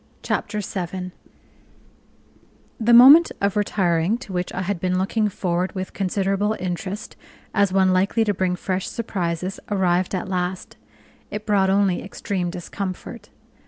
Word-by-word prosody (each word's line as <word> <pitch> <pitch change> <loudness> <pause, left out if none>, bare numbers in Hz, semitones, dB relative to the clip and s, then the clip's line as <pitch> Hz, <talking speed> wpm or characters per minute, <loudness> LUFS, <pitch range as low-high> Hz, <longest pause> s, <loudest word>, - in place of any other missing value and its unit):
Chapter 210 -1 -2
7 185 -1 -5 1.7
The 230 +1 +2
moment 275 +8 +9
of 200 -1 0
retiring, 190 -1 +1
to 240 -6 -10
which 180 0 -2
I 185 - -3
had 190 -1 -2
been 185 +1 0
looking 210 +3 0
forward 180 -1 -2
with 185 0 -5
considerable 195 +2 0
interest 185 +3 -5 0.4
as 200 -2 +2
one 190 -1 +3
likely 195 +5 +2
to 210 -2 +1
bring 185 -1 0
fresh 185 +1 -3
surprises, 185 -4 -3
arrived 185 -2 +1
at 185 - -3
last: 180 0 -3 0.5
it 210 0 -6
brought 200 -3 +2
only 195 -2 +2
extreme 195 -2 -3
discomfort. 185 +5 -6
190 Hz, 135 wpm, -22 LUFS, 180-205 Hz, 1.7 s, moment